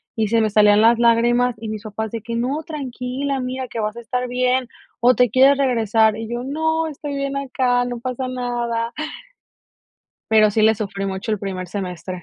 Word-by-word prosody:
y 220 -2 0
se 230 0 +3
me 215 - +2
salían 210 0 +5
las 230 +1 +5
lágrimas, 240 +1 +3
y 225 0 -7
mis 215 -1 -5
papás 220 0 -5
de 230 -2 -5
que: 230 +1 -5
"No, 270 +7 -1
tranquila, 270 -2 -4
mira, 255 0 -4
que 230 - -6
vas 215 +2 -3
a - - -5
estar 250 +2 -3
bien, 250 0 +1 0.3
o 250 +1 +6
te 245 -2 +3
quieres 270 +4 +5
regresar", 225 -5 +2
y 225 0 -6
yo: 240 +1 -3
"No, 320 +3 0
estoy 290 -1 -6
bien 275 0 -2
acá, 255 -2 0
no 245 -1 -4
pasa 255 +1 -4
nada". 240 -2 -2 1.4
Pero 215 -1 +5
sí 215 +1 +1
le 220 +1 +5
sufrí 200 -2 -4
mucho 195 +3 -4
el 210 - -1
primer 185 -2 -5
semestre. 180 -2 -5
235 Hz, 195 wpm, -21 LUFS, 220-255 Hz, 1.4 s, o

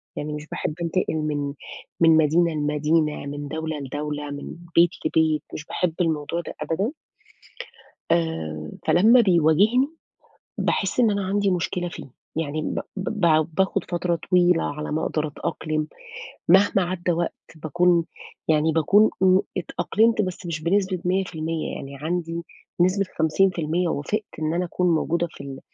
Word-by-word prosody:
يعني 150 +1 -4
مش 150 0 -7
باحب 155 - -3
أنتقل 170 0 0
من 145 -2 -2 0.5
من 165 -1 +6
مدينة 160 +2 +3
لمدينة، 150 0 0
من 145 +1 -5
دولة 160 +1 -4
لدولة، 145 +1 -4
من 145 0 -7 0.2
بيت 170 +1 +6 0.2
لبيت، 160 -1 +2
مش 150 - -6
باحب 180 0 -1
الموضوع 160 0 -1
ده - - -8
أبدًا 195 - -1 1.2
آآ 80 - -1 0.2
فلمّا 225 +8 +6
بيواجهني، 195 - +4 0.7
باحس 195 +4 0
إن 230 -3 +5
أنا 200 -1 -1
عندي 200 0 +1
مشكلة 175 0 -1
فيه، 170 - -9 0.3
يعني 155 -1 -2
ب - - -2 0.2
ب 190 -1 -3 0.2
ب 155 -2 +4
باخد 190 +2 +1
فترة 175 -1 0
طويلة 180 -2 +4
على 150 +1 -4
ما 155 +1 -1
أقدر 155 0 -1
أتأقلم، 155 +1 -3 0.6
مهما 195 +2 +5
عدّى 175 0 -1
وقت 170 +1 -1 0.2
باكون 170 +2 +2 0.4
يعني 160 0 +3
باكون 195 +8 +4
امم، 185 0 +6 0.2
اتأقلمت 220 +5 +1
بس 185 -1 -5
مش 165 -2 -3
بنسبة 190 +2 +1
100% 165 -4 -1
يعني 140 0 -8
عندي 165 +3 -3 0.4
نسبة 185 +3 +3
50% 170 +1 +1
وافقت 185 +8 -1 0.2
إن 155 +1 -1
أنا 180 +1 0
أكون 180 0 +1
موجودة 170 +2 0
في - - -16
ال 135 -1 -8
165 Hz, 145 wpm, -24 LUFS, 155-180 Hz, 1.2 s, من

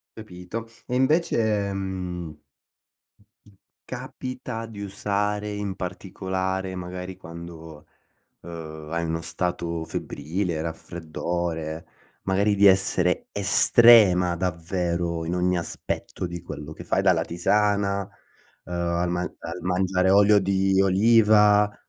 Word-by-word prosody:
Capito. 110 +1 -7 0.2
E 125 - -2
invece, 115 - +2
mhmm 90 -4 -5 1.5
capita 125 -3 -6
di 110 -3 -10
usare 105 +1 -2
in 105 -2 -3
particolare, 95 0 -3
magari 90 +1 -6
quando, 80 -2 -10 0.5
uhm, 80 -2 -9
hai 85 0 -1
uno 80 0 -2
stato 85 -2 -3
febbrile, 80 +3 -3
raffreddore, 80 0 -4 0.4
magari 100 +2 +2
di 100 - +5
essere 95 -2 +3
estrema 100 -3 +6
davvero 85 -1 -2
in 85 +2 -2
ogni 90 0 +1
aspetto 85 +1 -4
di 85 -1 -7
quello 75 -2 -8
che - - -10
fai, 95 - +1
dalla 90 -4 +3
tisana, 100 +3 +1 0.6
uhm, 90 - -6
al 85 0 0
man 90 0 -2
al - - -6
mangiare 90 +1 +1
olio 100 +1 +6
di 95 0 +2
oliva? 105 0 +5
90 Hz, 105 wpm, -25 LUFS, 85-100 Hz, 1.5 s, estrema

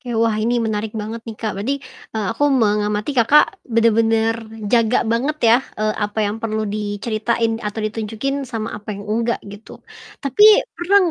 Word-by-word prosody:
Oke. 245 -5 -4
Wah 225 -1 +2
ini 235 +2 +1
menarik 215 0 -3
banget 220 +2 -5
nih 220 - -7
Kak, 220 -2 -3
berarti, 270 +7 -1 0.4
eee, 215 -2 -1
aku 290 +5 +1
mengamati 210 -2 +1
Kakak 280 - +4
bener-bener 225 0 +2 0.2
jaga 235 0 +3
banget 240 +7 0
ya, 230 +1 +7 0.2
eee, 215 0 0
apa 210 0 -3
yang 210 +2 -3
perlu 220 -1 -2
diceritain 215 +2 -1
atau 210 +1 -4
ditunjukin 225 +6 -3
sama 225 -2 -4
apa 210 -1 -6
yang 200 - -8
enggak 230 +2 -1
gitu. 205 +2 -11 0.5
Tapi 280 +10 +4 0.3
pernah 360 +3 +1
225 Hz, 160 wpm, -20 LUFS, 215-235 Hz, 0.5 s, ya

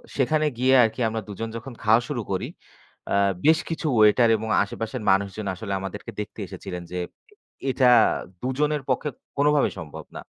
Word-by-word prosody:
সেখানে 155 +3 +2
গিয়ে 130 +1 +4
আরকি 110 +2 -1
আমরা 110 0 -3
২ 105 - -5
জন 115 0 -3
যখন 120 +3 -9
খাওয়া 110 +2 +5
শুরু 125 -5 -2
করি, 95 - -1 0.6
অ্যা 100 - +2 0.3
বেশ 160 +1 +6
কিছু 165 -1 -3
ওয়েটার 110 +2 +5
এবং 110 +1 -5
আশেপাশের 115 +4 -5
মানুষজন 100 +1 0
আসলে 100 +1 -5
আমাদেরকে 95 +2 -7
দেখতে - - -9
এসেছিলেন 90 -1 -7
যে, - - -3 0.7
এটা 125 -1 +4 0.5
২ - - -2
জনের 150 -1 +1
পক্ষে 140 +4 0 0.3
কোনোভাবেই 145 0 +3
সম্ভব 80 -3 -9
না। - - -6
115 Hz, 170 wpm, -24 LUFS, 105-140 Hz, 0.7 s, বেশ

